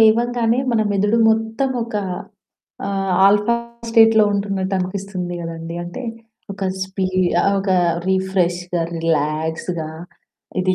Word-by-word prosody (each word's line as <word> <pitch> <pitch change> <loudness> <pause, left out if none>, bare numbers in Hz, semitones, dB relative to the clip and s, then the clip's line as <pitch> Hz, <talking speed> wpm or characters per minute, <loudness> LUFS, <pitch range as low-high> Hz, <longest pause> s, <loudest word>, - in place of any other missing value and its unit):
లేవంగానే 235 +1 +3
మన 220 - +2
మెదడు 205 +3 +2
మొత్తం 225 +4 0
ఒక 230 -1 -8 0.9
ఆహ్, 195 -1 -1 0.2
ఆల్ఫా 210 +3 +4 0.4
స్టేట్‌లో 225 -1 +6
ఉంటున్నట్టనిపిస్తుంది 190 -2 -2
గదండీ! 165 0 -6
అంటే 175 +9 -7 0.5
ఒక 195 0 -5 0.2
స్పీడ్ 185 -1 0
ఆహ్. 200 - +2
ఒక 195 - -2 0.4
రిఫ్రెష్‌గా, 180 -2 0
రిలాక్స్‌గా 160 +1 -1 0.7
ఇది 185 0 +2
190 Hz, 100 wpm, -20 LUFS, 175-215 Hz, 0.9 s, స్టేట్‌లో